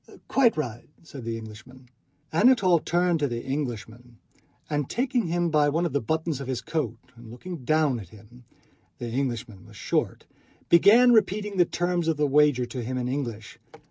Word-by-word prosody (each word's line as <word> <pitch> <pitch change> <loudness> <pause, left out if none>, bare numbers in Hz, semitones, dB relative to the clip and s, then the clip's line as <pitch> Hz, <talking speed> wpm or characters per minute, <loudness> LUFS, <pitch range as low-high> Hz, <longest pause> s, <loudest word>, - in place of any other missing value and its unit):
"Quite 245 -8 +3
right," 120 -5 -5
said 140 -6 -10
the 115 -1 -3
Englishman. 115 +4 -12 0.5
Anatole 190 -3 +4
turned 175 +1 +1
to 145 - +1
the 120 -2 -5
Englishman 120 -3 -5 0.5
and 145 -2 -2
taking 245 -4 0
him 170 0 0
by 150 -1 +3
one 165 +4 0
of 165 - -3
the 140 - +1
buttons 160 +2 -2
of 135 - -6
his 130 -2 -2
coat 125 -3 -3 0.2
and 115 -1 -13
looking 155 +5 -8
down 150 -2 +1
at 95 -6 -11
him—the 120 +2 -14
Englishman 120 -6 -3
was - - -15
short—began 225 +8 +2
repeating 210 -2 +1
the 175 - +5
terms 175 0 -1
of 160 -2 +1
the 150 - +2
wager 145 -3 +3
to 120 +1 -6
him 130 +2 -4
in 125 -1 -2
English. 120 -5 -5
145 Hz, 170 wpm, -26 LUFS, 120-170 Hz, 0.5 s, the